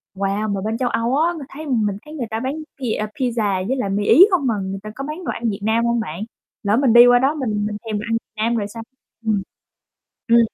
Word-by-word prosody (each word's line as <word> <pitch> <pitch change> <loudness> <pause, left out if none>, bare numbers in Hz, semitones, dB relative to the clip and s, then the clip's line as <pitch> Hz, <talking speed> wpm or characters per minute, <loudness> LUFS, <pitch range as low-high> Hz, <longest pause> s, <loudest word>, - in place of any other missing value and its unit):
wow, 200 +2 -1
mà 195 - -2
bên 220 +3 -2
châu 250 -1 0
Âu 235 +3 0
á, 335 +3 +2
ng 330 - -7
thấy, 305 +3 -8
ừm, 235 -6 +1
mình 200 -1 -1
thấy 300 - -10
người 265 -7 -4
ta 220 - -1
bán 260 +3 -2 0.3
pia 220 -4 -1
pizza 215 -7 0
với 265 - 0
lại 205 -6 -1
mì 205 +1 0
Ý 360 - +8
không 320 -8 +2
mà 230 - +2
người 190 +1 -4
ta 215 - -6
có 275 - -5
bán 305 +5 -6
đồ - - -1
ăn 230 -1 -2
Việt 200 0 -4
Nam 225 +2 +2
hông 235 0 +1
bạn? 175 -3 -5 0.4
Lỡ 205 +2 +2
mình 260 -4 +3
đi 240 +1 +9
qua 245 0 +6
đó 270 +4 +2
mình 215 -7 -1
mình 210 0 -3
thèm 215 -2 -2
đồ 210 - -5
ăn 225 - +3 0.2
Nam 230 +2 0
rồi 205 -3 -1
sao? 225 +2 -8 0.4
Ừm. 215 -3 +1 0.9
Ừm. 235 0 +6
230 Hz, 270 wpm, -21 LUFS, 210-255 Hz, 0.9 s, đi